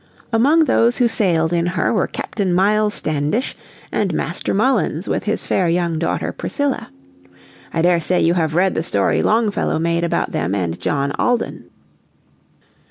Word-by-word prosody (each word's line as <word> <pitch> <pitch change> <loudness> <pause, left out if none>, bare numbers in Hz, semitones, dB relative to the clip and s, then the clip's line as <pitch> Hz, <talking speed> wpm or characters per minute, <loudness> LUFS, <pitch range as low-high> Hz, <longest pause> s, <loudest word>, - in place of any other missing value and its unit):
Among 290 +8 +4
those 235 -4 +2
who 245 - +3
sailed 175 -7 +1
in 170 0 +1
her 180 +4 0
were 210 - +1
Captain 190 -4 -2
Miles 210 +3 +2
Standish 155 - -1 0.4
and 190 -6 -1
Master 170 - -2
Mullins 205 - +1
with - - -2
his 215 - -2
fair 180 -3 +1
young 170 -1 0
daughter 170 - -1
Priscilla. 285 -2 -3 0.8
I 165 - -1
daresay 175 0 +2
you 165 - +3
have 160 -3 0
read 185 +2 +3
the - - -1
story 100 - +1
Longfellow 220 -5 +1
made 170 +1 0
about 170 - -1
them 85 +5 -1
and 85 -4 -2
John 140 -1 -1
Alden. 245 -1 -1
175 Hz, 155 wpm, -19 LUFS, 160-215 Hz, 0.8 s, Among